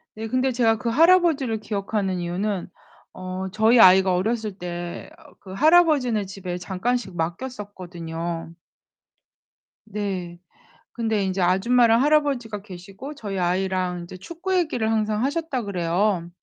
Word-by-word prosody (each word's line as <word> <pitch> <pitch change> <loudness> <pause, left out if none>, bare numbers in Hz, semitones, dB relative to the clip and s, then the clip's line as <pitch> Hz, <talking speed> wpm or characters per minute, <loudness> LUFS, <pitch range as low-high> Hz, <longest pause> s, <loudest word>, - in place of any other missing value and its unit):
네, 220 +1 -5
근데 255 +3 +1
제가 230 -2 +2
그 230 +2 -2
할아버지를 315 -5 +3
기억하는 200 -2 -2
이유는 180 +2 -3 0.5
어 185 +1 -5
저희 220 +4 +4
아이가 190 -2 +7
어렸을 215 +2 -1
때 175 -1 -6
어 - - -18
그 190 - -10
할아버지네 290 - +4
집에 190 -2 -6
잠깐씩 190 +4 -2
맡겼었거든요. 170 -4 -5 1.3
네. 190 -5 -4 0.5
근데 220 -3 -1
인제 190 0 -1
아줌마랑 230 +6 +4
할아버지가 275 -8 +1
계시고 195 +8 -9
저희 205 -8 -5
아이랑 180 0 -1
이제 175 +2 -10
축구 340 - -4
얘기를 305 -11 0
항상 215 0 0
하셨다 285 -1 -1
그래요. 180 -1 0
205 Hz, 305 characters per minute, -23 LUFS, 185-245 Hz, 1.3 s, 아이가